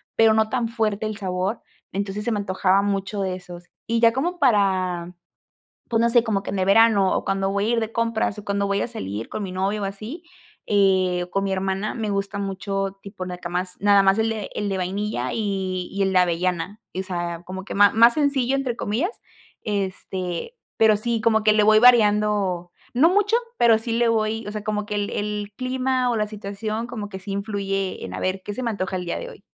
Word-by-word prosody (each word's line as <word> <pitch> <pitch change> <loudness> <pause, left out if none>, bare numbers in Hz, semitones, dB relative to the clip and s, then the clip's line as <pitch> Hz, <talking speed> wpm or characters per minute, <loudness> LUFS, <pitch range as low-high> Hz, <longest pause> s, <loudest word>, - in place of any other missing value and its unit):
pero 225 -1 +5
no 220 0 +3
tan 240 -3 0
fuerte 220 -2 -1
el 215 -1 -5
sabor. 190 +2 -2 0.3
Entonces, 200 +1 -3
se 235 - -1
me 215 - 0
antojaba 190 0 +2
mucho 200 0 -2
de 185 -1 -1
esos, 175 -1 -10 0.2
y 230 0 +1
ya 230 -1 +6
como 345 +8 -1
para, 185 - +1 0.7
pues, 225 -1 +1
no 235 - +4
sé 240 0 +5
como 205 -4 0
que - - -4
en 195 - -3
el 185 - +1
verano, 200 -2 +5
o - - -2
cuando 195 0 0
voy 200 +1 0
a - - 0
ir 235 - +2
de 220 -1 -3
compras, 230 -3 0
o 210 - -8
cuando 200 0 0
voy 200 0 +1
a - - -1
salir 110 - -5
con - - -5
mi 195 - -4
novio 195 +3 -1
o - - -1
así, 215 - -7 0.4
eh, 185 -3 +2
o 180 - -16
con 195 - 0
mi 195 - -1
hermana 190 +2 -1
me 220 -3 -3
gusta 200 0 -2
mucho 195 0 -3
tipo 195 -2 -7
nacamás, 180 0 -4
nada 200 0 +5
más 195 +2 +4
el 220 - +1
de 220 -2 -4
el 205 - -2
de 195 - -1
vainilla, 185 - -2
y 190 -4 -2
y 200 - -1
el 190 -1 +1
de 185 - +4
avellana, 180 +3 -1
y 185 - -3
o - - -1
sea, 175 -2 -4
como 190 +1 -7
que - - -7
ma 205 0 +6
más 235 +2 +6
sencillo, 275 -3 +1
entre 260 -4 -2
comillas. 245 - -1 0.5
Este, 190 - -3 0.2
pero 220 -1 +5
sí 230 +2 -1
como 220 -1 +3
que 215 - +6
le 210 -1 +4
voy 215 0 +6
variando, 210 -6 +4 0.2
no 280 +7 +5
mucho, 410 +3 +2 0.2
pero 230 -2 +5
sí 225 +1 -6
le 235 +1 +2
voy 220 -1 0
o 210 - -5
sea, 210 -1 -5
como 210 -1 -2
que 210 - -4
el 205 0 -1
el 210 0 -3
clima 255 0 0
o - - 0
la 210 -1 0
situación 215 +2 -4
como 215 -4 -6
que 190 -2 -7
sí 195 +1 -6
influye 195 -1 -2
en, 90 - -7
a - - -4
ver, 185 +1 -1
¿qué 205 - -5
se 255 - -4
me 235 - 0
antoja 190 -3 -3
el 180 - -3
día 170 - -2
de - - -6
hoy? - - -14
205 Hz, 230 wpm, -23 LUFS, 190-225 Hz, 0.7 s, ya